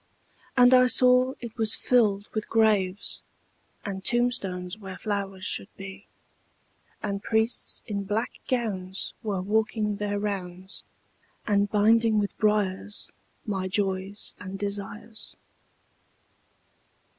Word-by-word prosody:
And 245 0 +8
I 255 0 +7
saw 250 +1 +5
it 235 -2 -7
was 220 -2 +3
filled 210 -5 +3
with 215 -1 -3
graves, 210 -4 +2 0.6
And 190 -2 -4
tombstones 200 -7 0
where 190 -3 -6
flowers 195 -3 -3
should - - -1
be; 195 0 -8 1.0
And 200 -2 -2
priests 220 +2 0
in 200 -3 -3
black 220 +5 -2
gowns 195 -7 -2
were 200 -5 -2
walking 210 0 +1
their 205 -1 -1
rounds, 190 -2 -4 0.6
And 205 -1 +2
binding 220 +2 +4
with 205 -1 0
briars 210 -1 0 0.3
my 190 -4 -1
joys 195 +1 -1
and 190 +1 -6
desires. 205 +2 -5
205 Hz, 110 wpm, -27 LUFS, 195-220 Hz, 1.0 s, And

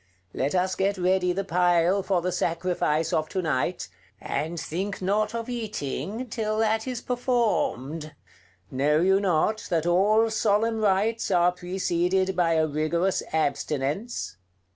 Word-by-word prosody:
Let 140 +6 -1
us 185 +1 +1
get 195 +2 0
ready 180 0 +2
the 195 +2 -2
pile 180 +1 +2
for 185 -3 0
the 180 - 0
sacrifice 170 -2 0
of 155 -1 0
to 185 - -2
night, 145 -6 -1 0.3
and 165 +3 -3
think 190 +7 -4
not 205 +4 0
of 230 -1 -4
eating 220 - -4
till 215 -2 -2
that 220 +1 +1
is 250 -2 -3
performed. 205 - -1 0.6
Know 145 +4 +2
you 190 +3 +4
not 200 +3 0
that 165 -3 0
all 210 +6 +3
solemn 220 +1 +1
rites 215 +2 +1
are 175 -2 +4
preceded 180 +1 -1
by 170 -2 +2
a 160 -1 +3
rigorous 155 +5 0
abstinence?" 150 - -2
185 Hz, 140 wpm, -26 LUFS, 165-215 Hz, 0.6 s, you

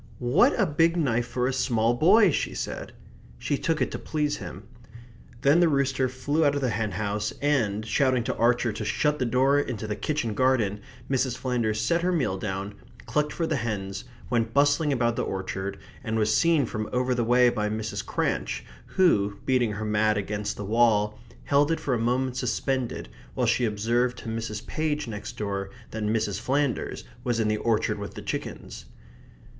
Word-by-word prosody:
"What 165 - +3
a 205 - +4
big 165 +2 +2
knife 120 -6 +1
for 125 -1 -1
a 130 - 0
small 120 -3 +2
boy!" 185 - +5
she - - -2
said. - - -5 0.4
She 145 - -1
took 160 +3 0
it - - -3
to - - -4
please 150 -1 -1
him. 90 -6 -8 0.8
Then 145 +5 +5
the 175 -2 +5
rooster 135 -2 +1
flew 145 +5 0
out 145 -1 +3
of 145 - -1
the 130 -3 +1
hen 105 -1 -2
house, 105 +2 -2
and, 110 -8 +1
shouting 130 0 +2
to - - -2
Archer 120 -1 +2
to 110 - -5
shut 150 +8 0
the 125 - 0
door 135 +4 +3
into 120 -6 -3
the 105 -1 -2
kitchen 145 -7 -2
garden, 115 -5 +1 0.3
Mrs. 130 -2 0
Flanders 115 -4 -1
set 170 +9 +1
her 180 +1 +1
meal 135 - 0
down, 100 0 -4 0.3
clucked 150 0 0
for 165 - -2
the 160 -2 0
hens, 105 -5 -3 0.2
went 115 -2 -1
bustling 145 +2 +3
about 120 -3 +1
the - - +1
orchard, 95 +1 -4 0.3
and 110 0 -1
was 110 0 +2
seen 165 -5 +3
from 110 -1 -4
over 125 0 +1
the 120 -1 0
way 125 +1 +5
by 105 -3 -1
Mrs. 110 0 -3
Cranch, - - -2 0.3
who, 100 - +3
beating 125 -5 +2
her 110 +1 -4
mat 105 0 +2
against 105 +1 -3
the 100 - -5
wall, 105 -1 +2 0.2
held 145 +2 +3
it 165 - 0
for 135 - -1
a 120 - 0
moment 125 +2 0
suspended 125 0 -2 0.3
while - - +1
she 125 - +2
observed 115 +4 0
to - - -7
Mrs. 110 -1 -4
Page 150 -3 -2
next 105 -2 -7
door 100 -2 -3 0.2
that 110 - -5
Mrs. 105 -2 0
Flanders 135 +1 -1 0.2
was 120 -2 0
in 110 - +2
the 105 0 +1
orchard 110 -1 0
with 100 - -7
the - - -7
chickens. - - -5
120 Hz, 190 wpm, -26 LUFS, 110-140 Hz, 0.8 s, boy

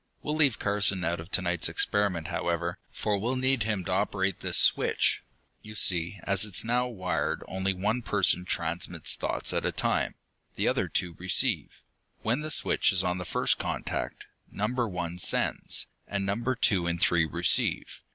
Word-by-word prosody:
We'll 150 - -2
leave 145 -7 +3
Carson 100 -2 +1
out 85 +1 -1
of 80 +2 -9
to 95 -1 +1
night's 90 -1 +2
experiment, 95 -6 0
however, 85 0 -2
for 105 -2 -2
we'll 120 +6 -1
need 130 -1 +1
him 105 -4 -1
to - - -3
operate 95 -1 0
this - - 0
switch. - - +3 0.4
You 110 0 -11
see, 90 -1 +1
as 100 -1 +2
it 105 -4 -5
is - - +1
now 125 +2 +1
wired 90 -8 -2
only 95 +1 -2
one 105 +6 -1
person 100 -5 +2
transmits 85 -1 0
thoughts - - -1
at - - 0
a - - 0
time. - - -1 0.4
The - - 0
other - - +1
two 90 -1 -2
receive. 95 0 +1 0.4
When 120 +5 0
the 155 - -5
switch 150 - +3
is 95 -2 +1
on 90 0 -1
the 90 - -5
first - - +1
contact, - - -4 0.3
Number 120 +4 -1
One 90 -1 -5
sends, - - +3 0.2
and 100 -1 -2
Numbers 115 +6 -1
Two 90 -4 +2
and 85 0 -2
Three 85 -2 +3
receive. 85 +1 0
95 Hz, 175 wpm, -28 LUFS, 85-105 Hz, 0.4 s, leave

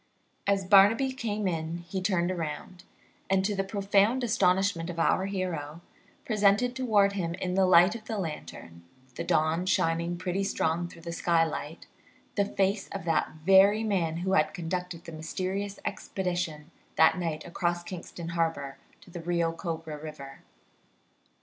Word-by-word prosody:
As 200 -1 +2
Barnaby 205 +7 +5
came 215 -5 -2
in 165 -1 -2
he 190 +2 -3
turned 185 -1 0
round, 170 +2 -6 0.5
and, 190 0 +2
to 205 0 0
the 195 - 0
profound 200 +5 +2
astonishment 190 -5 +2
of 170 - -6
our 185 +3 +2
hero, 170 -5 -4 0.4
presented 215 +3 +2
toward 210 -6 +3
him 170 -4 -2
in 185 -1 -3
the 190 0 +3
light 180 +2 +6
of 225 -1 -8
the 220 -1 -4
lantern, 150 - -6 0.3
the - - -4
dawn 160 +4 +1
shining 170 0 +1
pretty 185 +2 -2
strong 170 -3 0
through 165 -1 -14
the 170 - -5
skylight, 165 -2 -1 0.5
the 200 - +1
face 195 0 0
of - - -6
that 165 -2 +1 0.2
very 195 +3 +6
man 175 -7 0
who 190 - +1
had - - +2
conducted 180 -1 -4
the 170 - -9
mysterious 190 +5 -4
expedition 175 -4 -3 0.2
that 160 +3 +5
night 165 -3 -3
across 175 0 -2
Kingston 175 -2 -7
Harbor 165 -5 -2 0.2
to 180 - -17
the 175 - -7
Rio 170 -1 0
Cobra 165 -3 -5
River. 145 -3 -9
180 Hz, 150 wpm, -28 LUFS, 165-195 Hz, 0.5 s, light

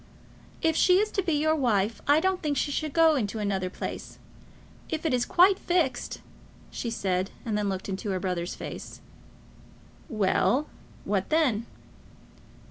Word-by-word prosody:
"If 320 -1 +3
she 365 +2 +5
is 425 +2 +1
to 390 - 0
be 345 -3 -1
your 310 +2 +2
wife, 225 -6 +1
I 290 +2 +6
don't 375 +2 0
think 295 -3 -1
she 290 - 0
should 310 +1 -2
go 325 +1 +5
into 225 -6 -1
another 195 -3 -1
place. - - -6 0.7
If 315 +1 -3
it 310 - +1
is 245 -1 +1
quite 375 +2 +5
fixed, 330 -9 -1 0.2
" - - -25
she 235 - -4
said, 190 -4 -1 0.2
and 220 -3 -1
then 210 0 0
she - - 0
looked 190 -1 -4
into 195 +1 -4
her 190 -1 -1
brother's 180 -2 -3
face. - - -8 1.1
"Well; 220 +6 +2 0.4
what 195 -2 -1
then?" 255 -9 +2
245 Hz, 165 wpm, -27 LUFS, 200-315 Hz, 1.1 s, I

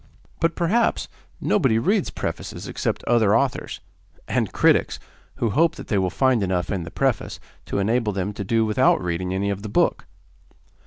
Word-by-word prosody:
But, 165 +1 +1
perhaps, 210 +7 +1 0.3
nobody 115 -5 +2
reads 190 - +1
prefaces - - -5
except - - -2
other 115 -3 +3
authors; 135 0 -2 0.5
and - - 0
critics, - - +2 0.4
who 115 - -1
hope 165 +6 +3
that - - -10
they 100 - +2
will 95 -1 +1
find 130 +2 +2
enough 90 -2 -1
in 95 -3 -1
the 80 - -7
preface 130 +2 -1 0.3
to - - -2
enable 110 +2 +1
them 100 +1 -3
to 100 - -5
do 115 +3 +1
without 110 +5 +3
reading 90 +1 -3
any 100 +2 -1
of 100 0 -4
the 105 - -6
book. - - +1
110 Hz, 170 wpm, -23 LUFS, 95-130 Hz, 0.5 s, other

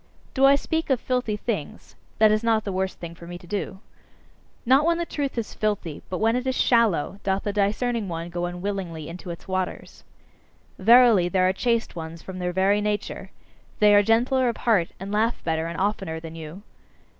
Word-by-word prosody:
Do 270 0 +4
I 280 - +7
speak 320 +3 -2
of 265 -3 +2
filthy 250 -5 -1
things? 205 -8 -5 0.2
That 215 -1 +5
is 215 +1 +1
not 225 -2 +2
the 200 - -4
worst 190 0 -2
thing 170 -1 -7
for 170 0 -13
me 175 0 -7
to 175 - -16
do. 195 +1 -4 0.8
Not 265 +4 +5
when 335 +1 +2
the 340 - -2
truth 280 -5 -3
is 230 - -3
filthy, 205 -8 -2
but 185 - -3
when 225 +3 +2
it 250 +1 -2
is 260 - 0
shallow, 210 - +2
doth 195 0 -1
the 205 - -2
discerning 215 +2 0
one 170 0 -5
go 175 0 -2
unwillingly 175 -3 -4
into 180 +2 -8
its 170 +3 -8
waters. 185 -1 -4 0.8
Verily, 225 -3 +6
there 185 0 +2
are 185 - +2
chaste 230 +1 -1
ones 165 0 -7
from 185 -1 -7
their 180 0 -1
very 195 +3 +2
nature; 210 0 -3 0.5
they 210 -2 +5
are 205 - +7
gentler 245 +4 +2
of 235 - -4
heart, 205 -8 +2
and 195 +2 -6
laugh 220 +3 0
better 160 0 -1
and 170 +1 -5
oftener 190 -5 -1
than 160 0 -9
you. 165 +4 -9
200 Hz, 200 wpm, -24 LUFS, 175-230 Hz, 0.8 s, I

